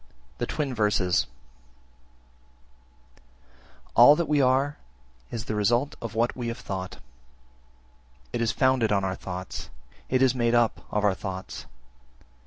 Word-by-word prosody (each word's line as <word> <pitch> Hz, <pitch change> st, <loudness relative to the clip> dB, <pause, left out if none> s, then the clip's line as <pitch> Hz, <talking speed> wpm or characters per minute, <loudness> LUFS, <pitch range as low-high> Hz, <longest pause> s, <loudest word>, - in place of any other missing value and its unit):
The -, -, -1 dB
Twin 145 Hz, -4 st, -2 dB
Verses 105 Hz, -5 st, +2 dB, 1.9 s
1. -, -, -28 dB, 0.7 s
All 125 Hz, +5 st, +8 dB
that 170 Hz, 0 st, -1 dB
we 150 Hz, -1 st, +3 dB
are 135 Hz, +3 st, +2 dB, 0.5 s
is 115 Hz, -1 st, -5 dB
the -, -, -3 dB
result 120 Hz, +7 st, +1 dB
of 115 Hz, -3 st, -6 dB
what 115 Hz, +2 st, +1 dB
we 120 Hz, -2 st, -4 dB
have 115 Hz, +1 st, -3 dB
thought: 95 Hz, -5 st, -5 dB, 1.4 s
it 120 Hz, -, -1 dB
is 115 Hz, -2 st, +2 dB
founded 130 Hz, -2 st, +2 dB
on 100 Hz, -1 st, +2 dB
our 95 Hz, -1 st, -1 dB
thoughts, 90 Hz, 0 st, -6 dB, 0.4 s
it 130 Hz, 0 st, +3 dB
is 130 Hz, -2 st, +4 dB
made 120 Hz, -2 st, +1 dB
up 120 Hz, -2 st, +2 dB
of 105 Hz, -, -1 dB
our 100 Hz, -2 st, +4 dB
thoughts. 95 Hz, 0 st, -6 dB
115 Hz, 140 wpm, -26 LUFS, 100-130 Hz, 1.9 s, All